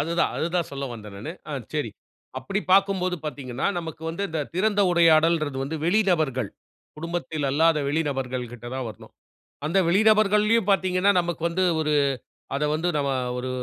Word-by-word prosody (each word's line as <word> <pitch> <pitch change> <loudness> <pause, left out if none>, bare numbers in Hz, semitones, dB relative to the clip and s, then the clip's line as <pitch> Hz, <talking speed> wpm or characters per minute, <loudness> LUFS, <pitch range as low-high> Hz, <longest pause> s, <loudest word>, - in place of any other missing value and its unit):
அதுதான், 170 +2 +1
அதுதான் 170 +1 -1
சொல்ல 140 0 -4
வந்தேன் 105 -3 -10
நானு. - - -6 0.2
ஆ - - -4 0.2
சரி. - - -1 0.5
அப்படி 195 +1 -2
பார்க்கும்போது 190 -2 +3
பார்த்தீங்கன்னா, 130 -4 -3
நமக்கு 160 -1 -7
வந்து 170 +5 -4
இந்த 160 -2 -2
திறந்த 205 +2 +2
உரையாடல்ங்கறது 160 -4 +4
வந்து 150 +4 -3
வெளிநபர்கள், 160 - +1 0.5
குடும்பத்தில் 165 -2 -3
அல்லாத 160 +2 +3
வெளி 160 +3 +1
நபர்கள் 130 -3 -3
கிட்ட 120 0 -10
தான் 130 -2 -3
வரணும். 110 - -12 0.5
அந்த 170 +5 +2
வெளிநபர்கள்லயும் 210 +2 +4
பார்த்தீங்கன்னா, 190 +1 +3
நமக்கு 170 -1 -4
வந்து 185 +2 0 0.2
ஒரு 150 -1 +1 0.6
அதை 150 +2 0
வந்து 165 +3 -1
நம்ம 140 -1 0 0.3
ஒரு 130 +1 -3
165 Hz, 150 wpm, -25 LUFS, 140-185 Hz, 0.6 s, உரையாடல்ங்கறது